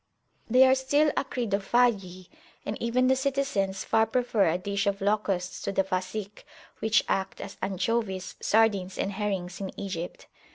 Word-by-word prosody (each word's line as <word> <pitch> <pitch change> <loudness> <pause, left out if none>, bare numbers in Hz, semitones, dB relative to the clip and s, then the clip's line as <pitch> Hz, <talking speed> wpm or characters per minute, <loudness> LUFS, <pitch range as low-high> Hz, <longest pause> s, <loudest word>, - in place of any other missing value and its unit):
They 255 +3 +7
are 260 - +6
still 285 +3 +2
acridophagi, 205 -6 0 0.4
and 205 - -3
even 240 +2 +2
the 260 +1 +4
citizens 265 -8 -1
far 220 0 +2
prefer 225 -5 +2
a 165 - +1
dish 200 +2 -2
of 200 0 0
locusts 195 -3 -1
to - - -2
the 195 0 +2
Fasikh, 190 +2 -4 0.4
which 220 -2 +3
act 190 0 -1
as 195 - -7
anchovies, 195 -1 -1
sardines, 205 -4 +2
and 195 - -1
herrings 195 -3 -3
in 190 - -6
Egypt. 180 -3 -5
200 Hz, 150 wpm, -27 LUFS, 190-235 Hz, 0.4 s, They